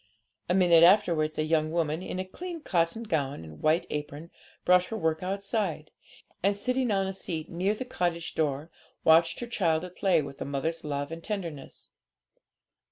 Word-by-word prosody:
A 180 - +3
minute 175 -3 +6
afterwards 170 -5 +4
a 155 - +1
young 155 0 +1
woman, 160 0 -1
in 185 - -5
a 185 - -2
clean 345 - -7
cotton 175 - 0
gown 145 - -2
and 80 -1 -12
white 155 +2 +2
apron, 150 +2 -5 0.3
brought 180 0 +5
her 225 - -5
work 160 -3 0
outside, 195 -4 -2 0.5
and, 200 +2 +2
sitting 250 +3 0
on 195 -2 +1
the 190 - -3
seat 165 -4 -4
near 185 +5 0
the 255 - -5
cottage 175 -7 -2
door, 150 +1 -1 0.3
watched 165 +3 +4
her 240 - -4
child 170 -7 +1
at 180 0 -11
play 190 -4 +3
with 140 -1 -9
a - - -2
mother's 140 +4 -2
love 145 0 -3
and 165 0 -7
tenderness. 170 -10 -6
170 Hz, 175 wpm, -28 LUFS, 155-195 Hz, 0.5 s, minute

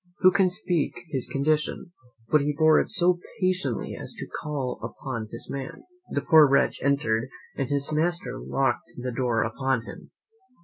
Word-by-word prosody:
Who 185 -1 +7
can 190 -1 +3
speak 180 -4 -1 0.2
his 130 -3 -2
condition? 150 +4 0 0.4
but 150 - +5
he 145 +1 -1
bore 155 -1 +6
it - - -1
so 180 -3 +3 0.2
patiently 185 - -1
as - - -8
to - - -5 0.2
call 140 -5 -3
up - - -6 0.3
his 115 - -4
man. 135 -1 -6 0.3
The 140 - -1
poor 150 +1 +7
wretch 135 +1 +2
entered, 130 -4 +1 0.3
and 135 - -2
his 140 +1 -1
master 170 +4 -1
locked 130 -3 -1
the 125 +1 -3
door 120 -2 +1
upon 125 +1 -1
him. - - -10
140 Hz, 165 wpm, -26 LUFS, 130-160 Hz, 0.4 s, Who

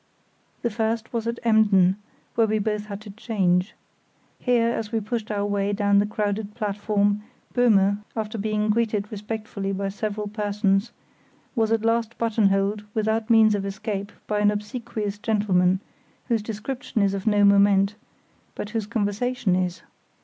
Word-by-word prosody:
The 235 - 0
first 225 +1 -2
was 230 -1 -2
at 235 0 -2
Emden, 205 -5 +4 0.4
where 230 -1 +3
we 215 0 +1
both 210 0 -2
had 200 0 -6
to 215 -1 -9
change. 195 -3 0 0.6
Here, 235 -2 +2
as 225 -3 -3
we 225 - +1
pushed 220 +1 -4
our 205 -1 -1
way 205 0 0
down 200 -1 +3
the 205 - +2
crowded 210 -1 -2
platform, 205 -1 0 0.3
Böhme, 205 -5 +4 0.2
after 220 0 -3
being 215 0 0
greeted 210 -2 0
respectfully 210 -2 -4
by 195 0 -2
several 210 +1 -3
persons, 205 0 0 0.6
was 225 -2 +1
at 225 -1 +1
last 230 0 +1
buttonholed 210 -2 +1
without 220 +1 0
means 220 -2 +6
of 205 -1 -1
escape 200 +1 -4
by 210 -1 -1
an 205 0 +4
obsequious 210 0 -4
gentleman, 195 -4 +2 0.5
whose 230 -2 +2
description 220 +2 -3
is 195 -1 +2
of 195 +1 -4
no 205 -1 +4
moment, 200 0 +5 0.6
but 210 - -5
whose 225 -3 -2
conversation 215 -1 0
is. 180 -1 -2
210 Hz, 150 wpm, -24 LUFS, 200-225 Hz, 0.6 s, means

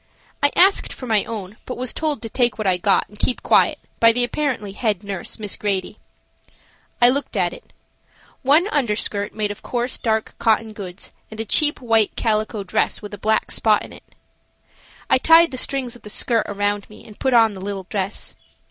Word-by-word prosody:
I 285 - +3
asked 385 +2 +4
for 255 - -8
my 220 -4 +2
own, 210 -2 -7
but 250 - -5
was 250 0 -2
told 305 -5 -2
to - - -3
take 240 -1 +1
what 215 - -3
I 185 -2 +3
got 195 +2 +2
and 210 +1 -17
keep 250 - -1
quiet - - +4 0.2
by 230 0 +7
the 245 +2 +1
apparently 245 -5 -2
head 210 -2 -1
nurse, 200 -3 -5
Miss 210 -3 -3
Grady. 195 -3 -3 1.0
I 240 - +7
looked 280 +3 -1
at - - +1
it. - - -14 0.7
One 295 +8 +4
underskirt 210 - 0
made 210 -1 -1
of 205 - -9
coarse 245 +1 -2
dark 220 -1 -1
cotton 220 -1 +1
goods 190 -3 -8 0.2
and 220 - -10
a 225 - -2
cheap 295 +7 +2
white 225 -3 +2
calico 215 -1 -1
dress 190 +3 -1
with 205 - -8
a 205 - -7
black 220 +2 0
spot 215 -2 +2
in - - -13
it. - - -17 0.9
I - - +3
tied 330 +4 +6
the 255 - -5
strings 255 -2 -1
of 240 - -15
the 210 - -10
skirt 230 +1 0
around 205 0 -1
me 215 - -15
and 215 - -14
put 265 -2 +1
on 225 -2 +5
the 190 - -9
little 195 0 -4
dress. 200 -1 -3
220 Hz, 200 wpm, -21 LUFS, 205-250 Hz, 1.0 s, by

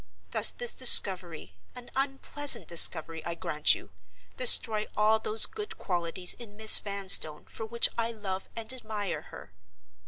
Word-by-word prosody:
Does - - -1
this 485 -1 -8
discovery—an 175 - -1
unpleasant 275 +1 -3
discovery, 165 -1 +4
I 170 - -8
grant 150 -2 -2
you—destroy 95 - 0
all 215 +1 -1
those 220 0 +2
good 425 -2 -12
qualities 180 0 -3
in 210 -4 -17
Miss 220 0 +8
Vanstone 195 -6 0
for 225 - -12
which 235 +1 +2
I 230 0 -5
love 195 -4 -10
and 230 +2 -7
admire 210 -9 -9
her? 100 - -17
205 Hz, 130 wpm, -24 LUFS, 170-230 Hz, -, Miss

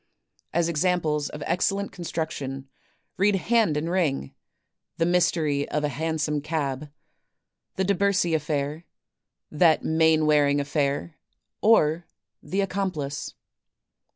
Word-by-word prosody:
As 170 0 +1
examples 160 -3 0
of 150 -1 -7
excellent 195 +3 0
construction, 155 -6 -5 0.5
read, 200 +1 +3
"Hand 210 -5 +2
and 155 +2 -2
Ring," 160 - -1 0.6
"The 165 - +2
Mystery 165 -5 +1
of 150 - -1
a 150 - +1
Hansom 155 0 -1
Cab," 150 -2 -3 0.9
"The 190 - 0
DeBercy 200 -2 +2
Affair," 150 +1 -2 0.7
"That 160 0 +4
Mainwaring 155 -3 +3
Affair," 145 +2 -1 0.4
or 170 -6 +3 0.3
"The 195 +2 -1
Accomplice." 180 -8 -3
160 Hz, 100 wpm, -25 LUFS, 145-180 Hz, 0.9 s, That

